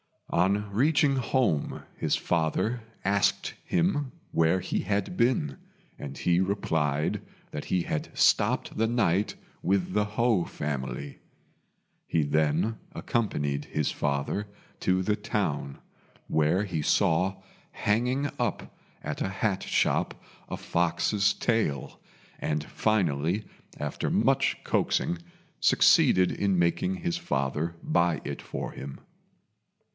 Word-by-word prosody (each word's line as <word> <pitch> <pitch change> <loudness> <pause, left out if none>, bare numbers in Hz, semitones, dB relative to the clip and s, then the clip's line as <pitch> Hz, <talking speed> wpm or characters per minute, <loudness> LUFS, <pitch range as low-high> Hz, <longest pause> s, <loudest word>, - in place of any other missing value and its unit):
On 100 +4 +2
reaching 140 +5 +3
home 120 - 0
his - - +1
father 85 +8 0 0.2
asked 100 +1 +1
him 170 -6 +1 0.2
where 80 +3 +3
he - - -1
had 100 -2 -1
been, 95 - +1 0.4
and 70 -1 -7
he 90 0 +2
replied 80 -6 0 0.3
that 75 - -5
he 90 -2 +1
had 75 - -3
stopped - - +3
the 115 +1 +2
night 105 -4 +1 0.3
with 95 -1 +1
the 105 0 +2
Ho 115 -7 +3
family. 70 -1 -4 0.9
He 80 - +2
then 75 +9 +1 0.2
accompanied 75 -11 -1
his 75 -2 -1
father 70 +8 -1 0.3
to 95 0 +1
the 105 +2 +1
town, 75 -9 -2 0.5
where 80 +6 +2
he 90 -6 -2
saw 90 +5 +2 0.4
hanging 125 +7 +1
up - - -2 0.3
at - - -4
a - - 0
hat 95 0 -1
shop - - +1 0.3
a - - -2
fox's 90 +4 +1
tail, 110 - -1 0.4
and 75 -1 -1
finally, 90 -1 0 0.3
after 75 -1 -2
much - - +2
coaxing, 85 - +1 0.4
succeeded 90 -1 +5
in 100 -2 +1
making 90 - +1
his 175 -2 -2
father 75 - -1
buy 85 -1 +2
it - - -5
for - - -5
him. 70 0 -8
90 Hz, 115 wpm, -28 LUFS, 75-110 Hz, 0.9 s, succeeded